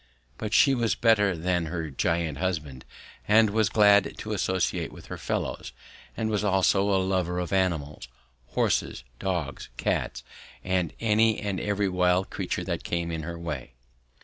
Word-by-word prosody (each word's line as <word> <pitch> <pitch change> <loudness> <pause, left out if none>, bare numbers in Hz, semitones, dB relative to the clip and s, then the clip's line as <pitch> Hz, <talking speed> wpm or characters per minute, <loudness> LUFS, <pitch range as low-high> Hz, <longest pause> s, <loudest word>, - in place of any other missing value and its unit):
But 105 - -4
she 135 +4 +5
was 120 -3 +1
better 105 -6 +3
than 90 0 0
her 80 -1 -4
giant 80 0 -1
husband 75 -8 -3 0.4
and 110 0 +5
was 110 -1 +2
glad 105 -2 +4
to 110 - -4
associate 95 -3 -1
with - - -12
her - - -7
fellows, - - -3 0.4
and 110 - -1
was 105 -1 0
also 95 0 +3
a 100 - +3
lover 95 -2 0
of 90 +1 -3
animals 80 -8 -1 0.5
horses, - - 0 0.2
dogs, 90 -6 -3
cats, - - -1 0.4
and 90 -3 0
any 110 0 +3
and 100 -2 -2
every 105 -1 0
wild 90 0 +1
creature - - -3
that - - -3
came 85 -1 -2
in 80 -1 -3
her 85 +2 -6
way. 75 -7 -6
95 Hz, 155 wpm, -27 LUFS, 85-105 Hz, 0.5 s, she